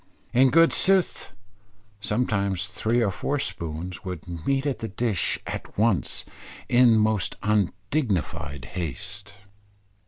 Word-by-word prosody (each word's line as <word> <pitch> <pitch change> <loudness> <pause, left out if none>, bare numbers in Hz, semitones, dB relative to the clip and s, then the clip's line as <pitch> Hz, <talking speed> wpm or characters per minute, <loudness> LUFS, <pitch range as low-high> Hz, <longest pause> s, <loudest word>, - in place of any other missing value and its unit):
In 130 +2 +6
good 165 +5 +5
sooth, 190 - +2 0.7
sometimes 100 -3 +1
three 115 +3 0
or 100 - +1
four 145 +9 -2
spoons, 90 - -5
would 90 -3 -6 0.2
meet 135 0 +1
at 135 -6 -1
the 115 - -3
dish 110 -2 -1
at - - -6
once 105 -3 +1 0.4
in 120 -2 +5
most 110 -3 +1
undignified 100 - -1
haste. 95 +4 -6
105 Hz, 115 wpm, -25 LUFS, 95-120 Hz, 0.7 s, In